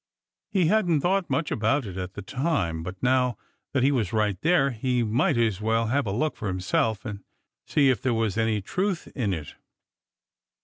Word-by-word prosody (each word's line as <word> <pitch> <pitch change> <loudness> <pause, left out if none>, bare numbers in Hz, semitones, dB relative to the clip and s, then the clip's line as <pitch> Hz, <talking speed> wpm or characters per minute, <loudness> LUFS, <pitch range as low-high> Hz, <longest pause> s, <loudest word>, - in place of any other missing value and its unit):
He 185 -4 +2
hadn't 175 -5 +3
thought 190 +2 +1
much 165 - -1
about 120 +5 +1
it 95 -3 -7
at 95 0 -5
the - - -6
time, 130 - -1
but 90 +3 -6
now 125 -1 +2 0.3
that 130 -3 +1
he 140 - +4
was 115 -9 0
right 105 -3 +1
there, 160 -5 +3
he 125 +1 0
might 120 +4 +1
as 110 -4 +1
well 115 +1 +1
have 140 -1 +1
a - - -1
look 150 +9 0
for 105 - -5
himself 100 +4 0
and 100 -3 -6 0.4
see 140 -3 +4
if 120 - -2
there 130 - +1
was 110 -3 0
any 110 -3 0
truth 185 - -2
in 110 -7 -1
it. 80 -5 -5
115 Hz, 190 wpm, -26 LUFS, 105-145 Hz, 0.4 s, he